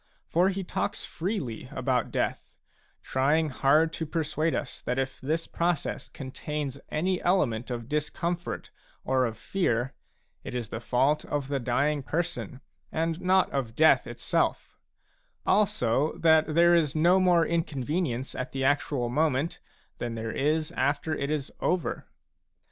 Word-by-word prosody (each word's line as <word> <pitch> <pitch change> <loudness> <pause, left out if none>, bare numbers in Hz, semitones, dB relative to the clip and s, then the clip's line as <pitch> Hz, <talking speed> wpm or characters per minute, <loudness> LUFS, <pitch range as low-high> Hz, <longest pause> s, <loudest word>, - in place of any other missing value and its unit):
For 180 +3 +3
he 195 0 -2
talks 205 +3 -2
freely 160 - -3
about 125 -3 0
death; - - -2 0.5
trying 150 +4 +2
hard 150 +4 +3
to 160 - -3
persuade 155 0 0
us 145 - -4
that 125 - -2
if 135 0 -2
this 160 +5 -1
process 170 -3 -1
contains 140 +1 -5
any 180 +4 0
element 135 -12 +1
of 120 -2 -4
discomfort 170 +4 -2 0.3
or 130 -1 +2
of 115 -2 -4
fear, 130 -10 0 0.5
it - - -6
is 120 -3 -3
the 110 - -4
fault 130 +5 +2
of 145 -2 -2
the 140 -1 0
dying 140 +4 +1
person, 165 -3 -3 0.3
and 165 +1 -1
not 185 +1 +3
of 125 -5 -2
death 155 +3 +5
itself; - - -1 0.7
also, 155 - +2
that 160 -1 +4
there 170 +1 +6
is 160 -4 +3
no 175 +4 +5
more 175 -3 +4
inconvenience 150 -4 -1
at 125 0 -5
the 135 0 -1
actual 140 -2 +1
moment 150 +3 0 0.4
than 120 -1 -3
there 115 0 -3
is 155 +2 0
after 145 +4 0
it 140 -2 -2
is 150 -2 -2
over. 180 -2 -1
150 Hz, 145 wpm, -28 LUFS, 130-165 Hz, 0.7 s, there